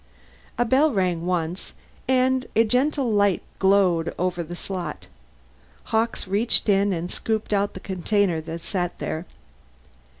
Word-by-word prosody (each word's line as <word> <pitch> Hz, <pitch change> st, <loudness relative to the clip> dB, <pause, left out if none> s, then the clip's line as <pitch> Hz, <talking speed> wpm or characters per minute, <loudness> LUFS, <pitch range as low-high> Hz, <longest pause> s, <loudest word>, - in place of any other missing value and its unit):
A 240 Hz, -, +2 dB
bell 275 Hz, +6 st, +4 dB
rang, 180 Hz, -5 st, 0 dB
once, 175 Hz, 0 st, -2 dB, 0.3 s
and 260 Hz, 0 st, +2 dB
a 225 Hz, -, +6 dB
gentle 260 Hz, +3 st, +1 dB
red -, -, 0 dB
light 200 Hz, -2 st, +3 dB, 0.2 s
glowed 190 Hz, -4 st, +3 dB
over 180 Hz, -1 st, -1 dB
the 170 Hz, +1 st, -6 dB
slot. 185 Hz, 0 st, -5 dB, 0.9 s
Hawkes 225 Hz, -2 st, 0 dB
reached 210 Hz, +6 st, +2 dB
in 200 Hz, 0 st, +3 dB
and 175 Hz, 0 st, -3 dB
scooped 220 Hz, -1 st, -2 dB
out 200 Hz, 0 st, +1 dB
the -, -, -6 dB
container 190 Hz, -2 st, 0 dB
that 165 Hz, +1 st, -7 dB
sat 175 Hz, -2 st, -2 dB
there. 160 Hz, +3 st, -4 dB
195 Hz, 140 wpm, -24 LUFS, 175-225 Hz, 0.9 s, a